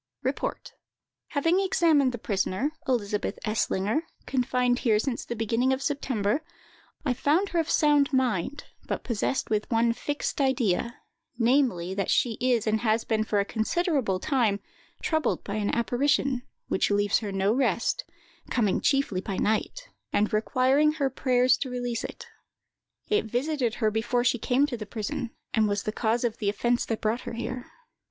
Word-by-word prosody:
"REPORT. - - -3 0.5
"Having 330 +5 +2
examined 325 -8 +3
the 240 - -5
prisoner, 205 +5 -1 0.2
Elizabeth 210 -5 -1
Eslinger, 215 +3 0 0.2
confined 250 -1 +1
here 220 -4 +3
since 240 +3 -2
the 235 - -5
beginning 230 +3 +1
of 265 +1 0
September, 260 -4 0 0.6
I 260 - +2
found 320 +10 +1
her 345 - 0
of 325 0 -1
sound 295 -2 +4
mind, 260 0 0 0.2
but - - -3
possessed 235 +2 -1
with 215 -1 0
one 230 0 +3
fixed 290 +3 -3
idea, 235 -4 +1 0.4
namely, 230 -8 +2
that 195 0 -2
she 235 -3 +2
is 245 -3 +2
and 220 0 +1
has 225 0 +1
been 220 -1 0
for 210 -1 0
a 200 - +1
considerable 245 - 0
time 235 -6 +1 0.4
troubled 315 -5 0
by 200 +1 -4
an 205 -1 0
apparition, 255 +2 +1 0.3
which - - +1
leaves 205 0 +2
her 210 -3 -4
no 195 +2 +1
rest, 250 - +1 0.5
coming 215 -6 +1
chiefly 275 -10 +1
by 195 -1 -4
night, 360 - -1 0.2
and 210 +1 +1
requiring 260 +7 +3
her 280 -4 0
prayers 255 0 +3
to 265 - -3
release 245 -2 -3
it. - - -7 0.8
It 425 - +1
visited 245 +1 -1
her 215 -3 +1
before 230 +3 0
she 245 -1 +2
came 255 +5 +2
to 265 -5 -4
the 215 -2 -7
prison, 220 +2 -4 0.2
and 220 -2 +3
was 205 0 -1
the 215 - -2
cause 225 +2 0
of 235 -2 -1
the 205 - +1
offence 240 +4 +1
that 225 - -2
brought 220 +3 0
her - - -6
here. 245 +2 -5
240 Hz, 165 wpm, -27 LUFS, 215-270 Hz, 0.8 s, sound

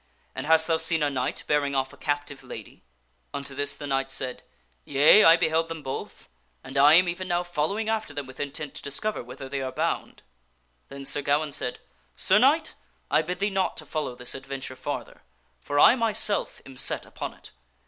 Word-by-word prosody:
And - - -5
hast 160 0 +6
thou 165 0 +2
seen 160 -1 +1
a 145 - +1
knight 130 -2 -2
bearing 145 -1 +1
off 135 0 -1
a - - -12
captive 145 -1 -3
lady? 120 -4 -9 0.3
" - - -42
Unto 140 -1 -5
this 140 +1 -2
the 145 - -8
knight 135 -1 -1
said, 130 -2 -2 0.2
" 65 -1 -40
Yea, 145 - +6
I 165 +1 +8
beheld 165 -1 +1
them 165 -2 -6
both, 135 -1 -6 0.4
and 135 - -10
I 145 +3 +7
am 180 +2 +6
even 180 +2 -3
now 175 -1 0
following 175 +6 -1
after 220 -6 -1
them 145 -1 -5
with 130 0 -13
intent 145 0 -4
to - - -7
discover 210 +10 -2
whither 125 +2 -9
they 135 0 -3
are 130 -1 -3
bound." - - -3 0.7
Then 140 0 -8
Sir 145 - +1
Gawaine 145 +2 +1
said, 125 -2 -2 0.2
" 60 0 -39
Sir - - +4
Knight, - - +3 0.4
I - - +4
bid 180 +3 -4
thee 200 +2 0
not 190 -1 0
to - - -6
follow 150 -6 -3
this 125 0 -2
adventure 135 -1 -6
farther, - - -6 0.4
for 145 0 -1
I 235 - +8
myself 220 -3 +1
am 135 -1 -12
set - - -1
upon - - -7
it. - - -14
145 Hz, 210 wpm, -26 LUFS, 135-165 Hz, 0.7 s, I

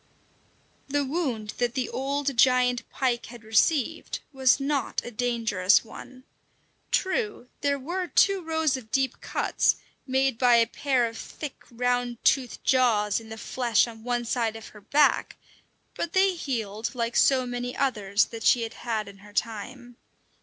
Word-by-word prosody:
The 285 0 0
wound 260 -8 -2
that 245 0 0
the 260 -2 -1
old 275 +1 -2
giant 250 0 +3
pike 245 -3 -1
had 240 -1 -12
received 270 +7 +1
was 260 -2 +3
not 275 -2 -1
a 240 - -6
dangerous 225 -5 +2
one. 255 +3 -12 0.7
True, 380 - -1
there 285 -1 +1
were 350 +7 -3
two 395 +2 +3
rows 320 -3 0
of 245 -4 -8
deep 265 +2 0
cuts - - +1 0.3
made 265 -2 +1
by 245 -2 +5
a 230 0 +5
pair 255 +1 0
of 225 -1 -6
thick, 300 -3 -8
round 245 0 -1
toothed 260 -3 +2
jaws 225 -6 +3
in 225 -1 -13
the 220 - -7
flesh 235 0 +1
on 225 -1 -11
one 240 0 -1
side 230 -2 -1
of 225 - -9
her 210 - -15
back; 290 +8 +2 0.6
but 340 - -4
they 380 0 +4
healed 230 - -4
like 235 -1 -2
so 260 -2 +4
many 245 0 -4
others 210 -7 +1
that 230 - -9
she 240 +1 +4
had 225 - -5
had 220 -3 -2
in 200 0 -12
her 205 +1 -15
time. 240 +3 -4
245 Hz, 160 wpm, -26 LUFS, 225-270 Hz, 0.7 s, by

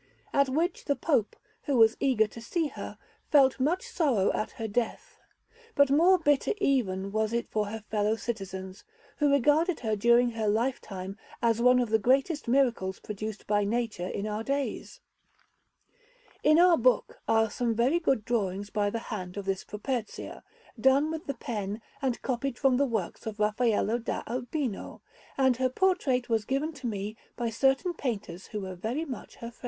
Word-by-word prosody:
At 280 -1 +3
which 325 +7 -1
the 285 - +1
Pope, 275 -11 0 0.3
who 280 -4 +1
was 225 -1 +6
eager 250 -6 +3
to 220 +2 -10
see 315 +6 -1
her, - - -8 0.3
felt 270 -3 +5
much 315 +8 0
sorrow 255 - +1
at - - -2
her 225 - -4
death; 225 +2 -3 0.6
but 280 -1 +4
more 345 +6 +6
bitter 290 -5 +2
even 200 - 0
was 220 +1 0
it 235 - -1
for 215 -1 -1
her 220 +1 -6
fellow 210 0 +1
citizens, 190 -5 -6 0.3
who 295 -2 +3
regarded 300 +5 +3
her 220 -3 0
during 235 +3 +4
her 225 -2 -2
lifetime 205 -4 -2 0.2
as 230 -1 +1
one 250 +1 +6
of 245 -3 0
the 220 - +4
greatest 275 - +1
miracles 235 -7 +1
produced 215 0 -6
by 205 0 +2
nature 215 -4 -2
in 200 - -4
our 215 +1 -3
days. 280 - -3 1.4
In 305 +1 +5
our 350 -1 +6
book - - +1
are 225 -1 +3
some 235 -2 -1
very 255 +9 +2
good 265 -10 +1
drawings 205 -3 -1
by 205 -1 +1
the 230 +2 -5
hand 185 -2 -6
of 200 - -4
this 195 -1 -1
Properzia, 220 +1 -5 0.4
done 270 +5 +4
with 320 -1 -6
the 280 - -2
pen 210 -3 -4 0.2
and 260 -3 -1
copied 260 0 -2
from 265 -2 +3
the 280 +1 +2
works 220 -3 -3
of 215 -1 -5
Raffaello 220 +1 +1
da 230 - -3
Urbino; 250 -1 -4 0.3
and 260 -3 +3
her 260 0 +1
portrait 275 -6 +1
was 225 -3 +1
given 275 +7 -1
to 270 -4 -6
me 210 -1 -4 0.2
by 235 -2 -2
certain 270 - +2
painters 200 - -4
who 210 - -5
were 190 -1 -5
very 225 - -3
much 260 -5 -8
her 235 0 -8
friends. - - -26
235 Hz, 175 wpm, -28 LUFS, 210-275 Hz, 1.4 s, was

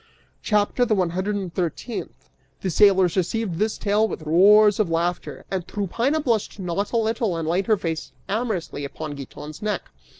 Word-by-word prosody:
CHAPTER 210 +3 +1
THE 225 -3 +2
ONE 180 -3 +1
HUNDRED 190 +4 -1
AND 190 -4 -4
THIRTEENTH. 185 +6 -4 0.3
The 190 - -1
sailors 190 -2 +4
received 190 -1 -1
this 215 +1 0
tale 210 +2 +2
with 160 - -6
roars 205 +7 +6
of 210 -5 +2
laughter, 170 +2 -2
and 185 -3 -2
Tryphaena 230 - -1
blushed 230 -7 0
not 195 +1 -2
a 235 - +1
little 225 -4 0
and 165 -1 -3
laid 180 +4 0
her 215 -2 +4
face 165 -4 -4 0.2
amorously 200 -8 -2
upon 150 +2 -5
Giton's 145 +2 -9
neck. 210 -1 -3
195 Hz, 170 wpm, -23 LUFS, 170-215 Hz, 0.3 s, roars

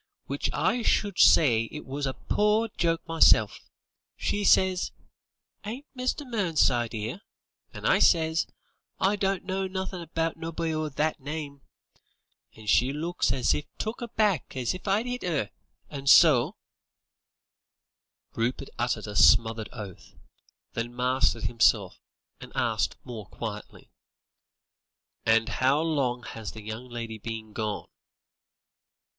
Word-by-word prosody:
Which - - -2
I 245 - +1
should 205 -2 +1
say 115 -7 +6
it 150 +6 -9
was 140 +1 -3
a 130 - -3
pore 210 +2 +1
joke 165 0 0
meself. 160 -10 +4 0.6
She 205 - -1
says: 190 -2 +3 0.7
'Ain't 235 +7 -6
Mr. 255 +3 -2
Mernside 155 - +1
'ere?' 110 - -4 0.5
and - - -9
I - - +4
says, 160 -1 +3 0.5
'I 200 +2 +2
don't 195 -1 0
know 190 0 -2
nothin' 190 -1 -4
about 165 0 -2
nobody 165 0 -3
o' 155 0 -2
that 150 +3 -1
name,' 145 0 -6 0.9
and 110 -1 -13
she 125 +5 +3
looks 160 -1 -1
as 130 -1 +2 0.2
took 220 +3 -4
aback 215 - 0
as 125 -2 0
if 185 +2 -9
I'd 205 +4 +2
'it 250 0 -4
'er, 150 - -1 0.4
and 140 -1 -3
so 145 -9 +6 0.9
" - - -59
Rupert 125 +4 -2
uttered 120 -2 -1
a 105 -1 -7
smothered 110 +1 +4
oath, 105 -6 -10 0.6
then 120 +1 -4
mastered 125 0 +1
himself, 115 -4 +2 0.4
and - - -11
asked - - 0
more 110 -5 -8
quietly: 105 -2 -8 1.4
"And 115 0 +4
how 130 +6 +2
long 140 -7 0
has 110 -2 -7
the 110 - -10
young 110 +4 -7
lady 115 -2 -6
been 110 0 -7
gone?" 105 -2 -3
140 Hz, 130 wpm, -27 LUFS, 115-185 Hz, 1.4 s, say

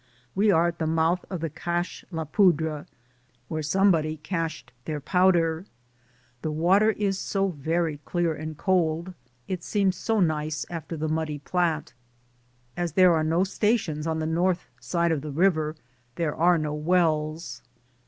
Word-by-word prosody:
We 205 +3 +3
are 170 -2 +4
at 170 - -8
the 160 - 0
mouth 165 +2 +1
of 185 -4 -4
the 165 - -1
Cache 175 +3 -3
la 165 -3 -3
Poudre 160 -3 +2 0.3
— 125 0 -39
where 155 -1 -2
somebody 160 -1 +2
cached 160 -5 -4
their 155 -2 -3
powder. 175 +1 +2 0.7
The 155 - -2
water 180 +8 +3
is 195 -2 -1
so 195 -1 0
very 160 0 -1
clear 170 +2 -1
and 155 0 -6
cold; 175 -1 0 0.3
it 185 -3 -4
seems 195 -3 +1
so 225 -1 0
nice 155 -3 0
after 165 -1 -5
the 155 +1 -2
muddy 155 -1 -1
Platte. 165 +1 -1 0.8
As 175 -3 -2
there 185 0 +6
are 160 -1 +2
no 165 +3 +2
stations 195 -6 0
on 160 0 0
the 160 - -2
north 175 +3 +1
side 170 -1 0
of 155 -3 0
the 150 - -6
river, 155 0 +1 0.4
there 160 -3 -1
are 175 +2 +4
no 155 -1 -2
wells. 155 -4 0
165 Hz, 160 wpm, -26 LUFS, 155-180 Hz, 0.8 s, there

